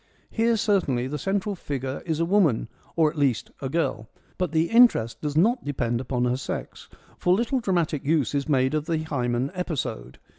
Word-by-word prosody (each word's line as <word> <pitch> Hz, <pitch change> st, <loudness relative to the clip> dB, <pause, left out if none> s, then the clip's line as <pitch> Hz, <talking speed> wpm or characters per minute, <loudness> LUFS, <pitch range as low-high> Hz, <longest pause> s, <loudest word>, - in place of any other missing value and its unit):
Here 230 Hz, 0 st, +2 dB
certainly 180 Hz, -, +1 dB
the 150 Hz, +3 st, -4 dB
central 200 Hz, +2 st, -1 dB
figure 135 Hz, -6 st, -4 dB
is 160 Hz, -1 st, -1 dB
a 165 Hz, -, +2 dB
woman, 165 Hz, -, +2 dB, 0.3 s
or, 160 Hz, -2 st, +3 dB
at 155 Hz, -, -7 dB
least, 135 Hz, -6 st, +1 dB
a 135 Hz, -, -3 dB
girl; 125 Hz, -7 st, -1 dB, 0.3 s
but 180 Hz, -4 st, 0 dB
the 160 Hz, +3 st, +1 dB
interest 230 Hz, -, +4 dB
does 150 Hz, 0 st, -2 dB
not 235 Hz, +8 st, +3 dB
depend 120 Hz, -4 st, -1 dB
upon 125 Hz, -1 st, -1 dB
her 125 Hz, +1 st, +1 dB
sex, 130 Hz, -, -6 dB, 0.3 s
for 180 Hz, 0 st, +3 dB
little 235 Hz, +5 st, 0 dB
dramatic 170 Hz, -, 0 dB
use 145 Hz, -4 st, +1 dB
is 140 Hz, +1 st, -1 dB
made 130 Hz, -1 st, +2 dB
of 155 Hz, 0 st, -1 dB
the 165 Hz, -2 st, +1 dB
Haemon 130 Hz, -4 st, -1 dB
episode. 155 Hz, -, -4 dB
150 Hz, 185 wpm, -25 LUFS, 130-180 Hz, 0.3 s, interest